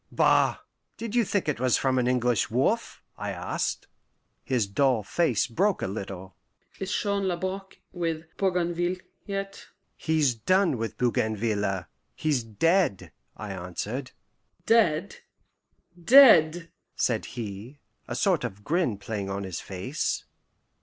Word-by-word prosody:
"Bah! - - +3 0.4
Did 230 -2 -5
you 240 -1 +4
think 200 -3 -1
it 150 -6 -1
was 130 -1 +3
from 130 -1 +1
an 125 - +1
English 125 -3 +1
wolf?" 135 - 0 0.2
I - - -3
asked. - - -3 0.6
His 125 -5 +1
dull 120 +2 +1
face 130 - +1
broke 185 - 0
a - - 0
little. 95 -2 -7 0.4
"Is 195 0 -4
Jean 200 -1 0
Labrouk 190 +2 -4 0.2
with 165 -3 -2
Bougainville 175 -1 0 0.3
yet?" 195 0 -5 0.3
"He's 155 -5 +1
done 170 - +2
with 115 0 -4
Bougainville; 110 -5 0 0.3
he's 150 -5 0
dead," 165 - +1 0.3
I 105 -2 -6
answered. 95 +8 -5 0.6
"Dead! 200 -6 +3 0.9
dead!" 175 - +7 0.2
said - - 0
he, 110 +4 -6 0.3
a 120 - -4
sort 175 +4 +2
of 105 -4 -6
grin 155 - 0
playing 100 -1 -4
on 100 +1 -3
his 95 -3 -5
face. 100 +11 -3
135 Hz, 125 wpm, -27 LUFS, 110-180 Hz, 0.9 s, dead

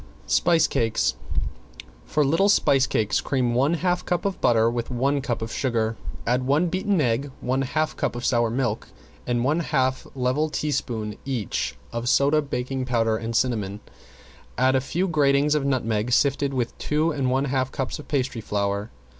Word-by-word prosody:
~SPICE 165 - +3
CAKES~ 115 -1 0 0.9
For 150 -1 +1
little 165 +8 +3
spice 135 -9 +4
cakes 105 -5 +1
cream 125 -3 0
one 140 +7 +2
half 180 +1 0
cup 175 +2 -1
of 195 -3 -2
butter 115 -1 +4
with 120 0 -2
one 135 +3 0
cup 120 -5 -2
of 115 - -5
sugar, 115 -4 0 0.3
add 125 +2 +2
one 145 +7 +2
beaten 190 +1 0
egg, 130 +1 +1
one 130 +2 0
half 155 +4 -1
cup - - -2
of 120 - -4
sour 120 -2 +2
milk, 120 -2 -1 0.4
and 120 -1 +1
one 150 +6 +2
half 130 -5 0
level 130 +4 0
teaspoon 120 -8 -2
each 125 -8 -2 0.2
of 115 0 -2
soda, 145 +4 +4
baking 135 -2 -3
powder, 115 -3 +1
and 115 +1 -4
cinnamon, 105 -5 0 0.8
and 130 +1 +3
a 130 - +3
few 175 +8 -1
gratings 145 -2 +3
of 150 -2 +1
nutmeg 115 -4 0
sifted 140 +2 +2
with 125 -3 -2
two 155 +2 +1
and 140 -4 -1
one 135 +2 +1
half 130 -1 -1
cups 135 +1 -3
of 150 - -10
pastry 130 -5 -1
flour. 100 0 -2
130 Hz, 170 wpm, -24 LUFS, 120-145 Hz, 0.9 s, spice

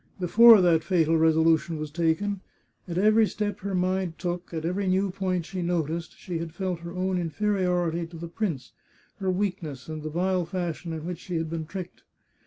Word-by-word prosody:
Before 225 +4 +8
that 170 -3 +4
fatal 165 -3 +2
resolution 160 0 +3
was 155 -1 -5
taken, 170 +5 0 0.5
at 170 -1 -4
every 215 +3 +5
step 205 0 -3
her 195 0 -3
mind 185 -1 0
took, 175 0 -4
at 160 -1 -4
every 190 +3 -1
new 190 +1 +2
point 185 -3 -1
she 185 +1 -5
noticed, 170 -1 -2
she 175 -3 -5
had 165 0 -6
felt 185 -2 -2
her 170 0 -8
own 185 0 0
inferiority 175 -1 0
to 165 0 -11
the 170 +1 -6
prince, 165 - -3 0.5
her 190 -2 -2
weakness, 180 -8 -2
and 155 -1 -5
the 155 - -4
vile 180 +3 0
fashion 175 -1 -4
in 160 -1 -5
which 180 -1 -4
she 180 - -6
had 160 -1 -2
been 160 -2 -4
tricked. 180 +1 -7
175 Hz, 190 wpm, -26 LUFS, 165-190 Hz, 0.5 s, Before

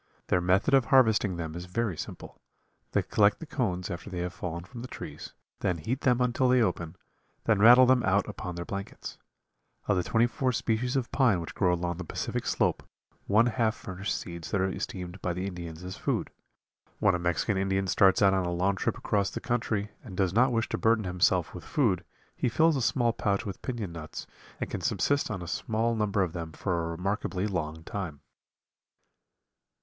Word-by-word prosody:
Their 90 - +3
method 95 +10 +2
of 135 -2 +5
harvesting 110 - +4
them 80 -2 -4
is 85 +1 -6
very 110 0 -1
simple. - - -8 0.5
They - - +2
collect - - +3
the - - -7
cones 90 +1 -2
after 90 +3 -6
they 95 - -6
have 90 0 -3
fallen 85 -2 -5
from 115 +6 -10
the 125 - -6
trees, - - -8 0.3
then 90 - 0
heat 120 - -3
them 125 -1 +3
until 125 +1 +2
they 125 0 +5
open, 85 -7 0 0.5
then 110 -3 +2
rattle 120 +4 +9
them 130 0 +4
out 100 -1 +2
upon 90 -1 -6
their 85 0 -5
blankets. 100 +1 -6 0.7
Of 100 - +3
the - - +3
twenty 115 +5 +3
four 125 +1 0
species 120 +3 0
of 130 -3 -1
pine 120 -9 +3
which 85 - -6
grow 90 -3 +2
along 85 -1 -1
the 90 - -5
Pacific - - -3
Slope - - +1 0.5
one 110 +3 +5
half 115 -2 +1
furnish 95 +2 -5
seeds 85 -2 -5
that 100 - 0
are 95 +1 +1
esteemed 90 0 -5
by 90 - -1
the 90 +2 -3
Indians 85 -3 -6
as 90 +1 -6
food. - - -1 0.7
When 100 -3 +3
a 90 - 0
Mexican 85 +4 0
Indian 95 0 0
starts 95 +1 +4
out 95 -1 +6
on 95 -1 +1
a 85 - -2
long 95 +3 +1
trip - - -1
across 100 -2 0
the - - -5
country 110 -3 -1
and 95 -6 -9
does 95 -3 +1
not 125 +4 +4
wish 115 -1 0
to - - -2
burden 110 -1 +3
himself 90 -1 +1
with 90 - -8
food 100 - +1 0.3
he - - 0
fills 160 +6 +3
a 135 - 0
small 120 0 +2
pouch 100 0 0
with 100 -3 -6
piñon 115 -8 -4
nuts 80 -2 -7 0.3
and - - -2
can - - -5
subsist 145 0 +1
on 95 -5 -4
a - - -7
small 115 +5 0
number 105 -3 +1
of 85 -3 -3
them 80 -2 -5
for 85 -1 -1
a 80 - -2
remarkably 95 +2 -2
long 80 -5 -3
time. 90 -8 -5
95 Hz, 205 wpm, -28 LUFS, 90-115 Hz, 0.7 s, rattle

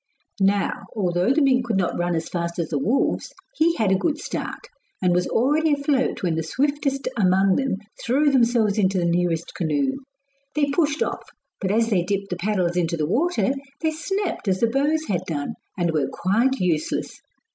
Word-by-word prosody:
Now, 195 +1 +1
although 180 +1 +1
the 300 +2 +3
mink 255 -3 +3
could 225 -4 +1
not 180 -2 0
run 175 0 0
as 160 0 -2
fast 170 -1 -3
as 170 -3 -2
the 145 - -1
wolves, 230 - 0 0.2
he 335 +1 +2
had 215 - +1
a - - +5
good 305 +3 0
start, 310 - -5 0.3
and 180 -2 +2
was 180 0 +1
already 295 +6 +2
afloat 285 -5 0
when 175 -3 +1
the 160 - -1
swiftest 275 - -1
among 190 -2 +3
them 270 -6 0 0.3
threw 280 +5 +3
themselves 235 -5 +3
into 190 -1 +2
the 175 - +1
nearest 170 -1 0
canoe. 270 - 0 0.6
They 290 -2 +1
pushed 295 0 +1
off, - - -5 0.3
but 190 - -2
as 225 +3 +2
they 185 -4 +3
dipped 195 +2 -2
the - - 0
paddles 180 -2 0
into 170 -1 0
the 155 - 0
water, 270 - +1 0.3
they 320 -1 +1
snapped 355 - -3
as 190 -1 +1
the 230 -1 +2
bows 300 +4 +1
had 180 -3 0
done, 145 -3 -3 0.2
and 175 -2 +1
were 155 -3 0
quite 230 +9 +1
useless. 175 -8 -1
205 Hz, 190 wpm, -23 LUFS, 175-275 Hz, 0.6 s, a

